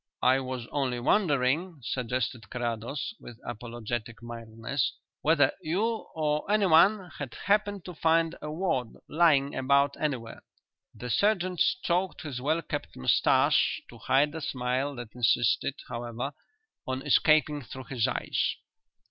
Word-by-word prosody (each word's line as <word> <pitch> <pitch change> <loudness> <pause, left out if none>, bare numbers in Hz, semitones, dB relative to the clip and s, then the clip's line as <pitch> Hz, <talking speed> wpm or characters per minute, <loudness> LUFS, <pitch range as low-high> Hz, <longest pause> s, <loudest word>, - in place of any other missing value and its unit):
"I 130 +1 +5
was 130 -2 -4
only 130 -4 -1
wondering," 150 - +1
suggested 125 -2 -2
Carrados, 120 - -3
with 120 - -11
apologetic 120 0 -5
mildness, 115 +2 -3 0.3
"whether 150 -3 +4
you, 215 +8 -1
or 150 -1 0
anyone, 195 -1 +4
had 135 -5 -5
happened 205 -1 0
to 180 - -7
find 165 +1 +2
a 150 - -5
wad 155 -8 -1
lying 145 -4 +3
about 140 +2 +3
anywhere." 130 -7 -3 0.5
The 125 0 -5
sergeant 185 - +1
stroked 185 - +1
his 140 -6 -5
well 155 +5 0
kept - - -5
moustache 65 - +3
to - - -13
hide 145 +3 +3
the 160 +1 -6
smile 130 +1 -1
that 120 -3 -8
insisted, 120 +2 +2
however, 120 +3 -4 0.5
on 130 +1 -2
escaping 150 -1 +3
through 130 +1 -9
his 125 -3 0
eyes. - - -1
140 Hz, 130 wpm, -28 LUFS, 120-165 Hz, 0.5 s, I